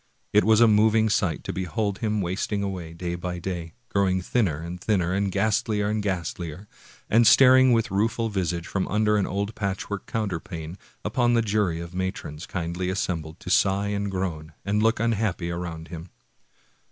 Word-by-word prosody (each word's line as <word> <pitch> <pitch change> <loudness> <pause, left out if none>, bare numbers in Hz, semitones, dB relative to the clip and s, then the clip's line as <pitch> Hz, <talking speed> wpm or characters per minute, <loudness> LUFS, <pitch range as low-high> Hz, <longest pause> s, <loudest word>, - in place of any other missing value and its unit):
It 105 - +5
was 110 +1 +5
a 120 - +8
moving 110 +1 +4
sight 90 -7 0
to - - -4
behold 100 +2 -2
him 110 -2 0
wasting 100 +3 -2
away 90 -5 -4
day 85 +1 -4
by 90 0 -4
day, 85 -2 -5 0.2
growing 95 -2 +2
thinner 90 -4 0
and 90 +2 -7
thinner 95 -4 +1
and 100 0 0
ghastlier 105 +1 +1
and 105 0 0
ghastlier, 90 -1 -4 0.4
and 115 +1 +5
staring 130 -1 +7
with 115 0 +2
rueful 115 +3 +1
visage 90 -5 -2
from 95 +1 -2
under 105 +1 +2
an 100 -2 +1
old 100 +2 -2
patchwork 100 -1 -4
counterpane, 85 -5 -4 0.3
upon 120 +3 +2
the 115 - +3
jury 100 -6 0
of 85 0 -7
matrons 90 -4 -4
kindly 90 +1 -3
assembled 85 -4 -3
to 90 - -5
sigh 100 +1 +3
and 100 0 -1
groan 85 -5 -4
and 105 +2 +1
look 115 0 +2
unhappy 105 -6 0
around 85 -2 -5
him. 85 +1 -8
95 Hz, 170 wpm, -25 LUFS, 85-105 Hz, 0.4 s, a